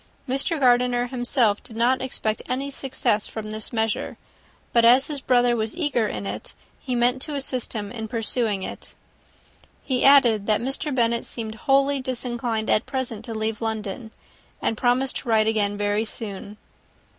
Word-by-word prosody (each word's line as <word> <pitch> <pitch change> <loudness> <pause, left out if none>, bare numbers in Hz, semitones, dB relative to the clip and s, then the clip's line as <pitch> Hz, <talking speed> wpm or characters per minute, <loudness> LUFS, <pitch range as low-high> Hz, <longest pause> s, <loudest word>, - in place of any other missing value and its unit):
Mr. 275 +5 +1
Gardiner 245 -1 +3
himself 245 -4 +1
did 225 - -10
not 245 +3 +2
expect 220 -4 -2
any 275 +2 -2
success 245 -5 0
from 215 -1 -6
this 215 0 -5
measure; 225 -2 -2 0.6
but 235 - +5
as 250 +3 +6
his 290 -3 -4
brother 245 -2 +3
was 220 -1 -2
eager 280 -10 +1
in 105 - -5
it, 100 +2 -6 0.2
he 255 -2 -3
meant 245 +2 +2
to 295 +1 -2
assist 260 -3 -3
him 205 -3 -4
in 220 -2 -5
pursuing 225 -3 -1
it. - - -8 0.9
He 255 -2 0
added, 240 -7 +6
that 215 -1 +3
Mr. 270 +4 -1
Bennet 235 -2 +1
seemed 220 -2 -3
wholly 275 +4 +2
disinclined 240 -3 -3
at 215 - +2
present 255 -5 -4
to 230 - -6
leave 220 0 -2
London, 220 0 -4 0.5
and - - -1
promised 250 +3 +1
to - - -7
write 220 -1 +4
again 205 -2 +1
very 205 +1 0
soon. 205 -1 -7
235 Hz, 165 wpm, -24 LUFS, 220-255 Hz, 0.9 s, as